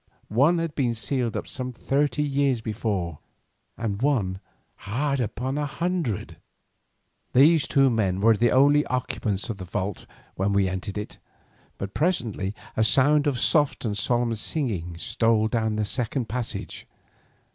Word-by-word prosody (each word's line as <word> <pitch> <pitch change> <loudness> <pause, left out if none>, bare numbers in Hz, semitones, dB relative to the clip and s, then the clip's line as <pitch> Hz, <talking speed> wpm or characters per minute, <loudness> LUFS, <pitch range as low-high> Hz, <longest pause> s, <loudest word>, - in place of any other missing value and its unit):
One 140 +10 +3
had 165 -2 -2
been 125 -5 0
sealed 120 0 -1
up - - -5
some 130 -1 -4
thirty 140 +3 0
years 140 -3 +1
before, 105 -8 -3 0.6
and 105 -2 -3
one 110 -10 +1 0.4
hard 140 +7 -2
upon 130 +4 -2
a 145 - -1
hundred. 170 - -2 1.0
These 150 +4 +5
two 135 -2 +4
men 100 -5 0
were 110 +2 +5
the 120 +3 +3
only 145 +4 +5
occupants 110 -5 -1
of 105 - -6
the 95 - -7
vault 95 +2 -4 0.3
when 95 +2 0
we 100 -1 +3
entered 95 +2 -4
it, 105 - -6 0.6
but 100 0 -5
presently 115 - -1 0.2
a 110 - +2
sound 145 +6 +4
of 135 -3 0
soft 145 -5 +2
and 105 -3 -1
solemn 120 +3 +1
singing 105 - -3
stole 110 +4 +2
down 110 -1 0
the 105 0 0
second 120 +2 -1
passage. 120 +2 -5
120 Hz, 145 wpm, -25 LUFS, 105-140 Hz, 1.0 s, These